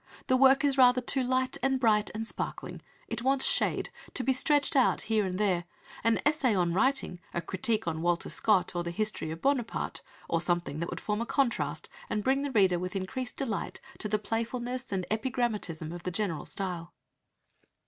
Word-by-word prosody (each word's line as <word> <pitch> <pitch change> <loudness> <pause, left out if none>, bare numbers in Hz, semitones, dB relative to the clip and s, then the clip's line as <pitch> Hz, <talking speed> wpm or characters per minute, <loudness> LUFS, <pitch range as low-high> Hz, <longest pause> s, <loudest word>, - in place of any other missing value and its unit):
The 255 - +3
work 270 +1 +6
is 275 -1 +2
rather 250 0 +7
too 255 +2 +1
light 255 0 0
and 265 0 +1
bright 215 -4 +3
and 225 +1 -3
sparkling, - - -5 0.3
it 230 +1 -4
wants 265 +1 +2
shade - - +1 0.2
to 255 - +2
be 265 +2 +3
stretched 290 +2 +2
out 260 -2 +4
here 215 -3 +1
and 180 0 -3
there... 185 -4 +1 0.4
an 230 0 +3
essay 295 -7 +3
on 175 -2 +1
writing, 260 -3 +1 0.2
a - - +1
critique 190 +5 -1
on 160 -1 -2
Walter 175 0 0
Scott, 190 -4 +2
or 175 - 0
the 170 - -3
history 215 -2 -2
of 160 +1 -7
Buonaparte, 270 -5 -1 0.3
or 165 - 0
something 175 -4 -1
that 170 - -2
would - - -5
form 210 +1 -2
a - - -1
contrast, 270 -4 0 0.2
and 210 - -1
bring 270 +3 +2
the 285 - -2
reader 190 -8 +3
with 180 +2 -4
increased 245 +7 -3
delight 230 -7 -3 0.2
to 215 - -3
the 215 - +2
playfulness 240 +4 -3
and 190 -2 -1
epigrammatism 215 -9 -1
of 175 - -7
the 180 - -3
general 180 -4 -2
style." 180 -3 -4
220 Hz, 190 wpm, -29 LUFS, 180-255 Hz, 0.4 s, rather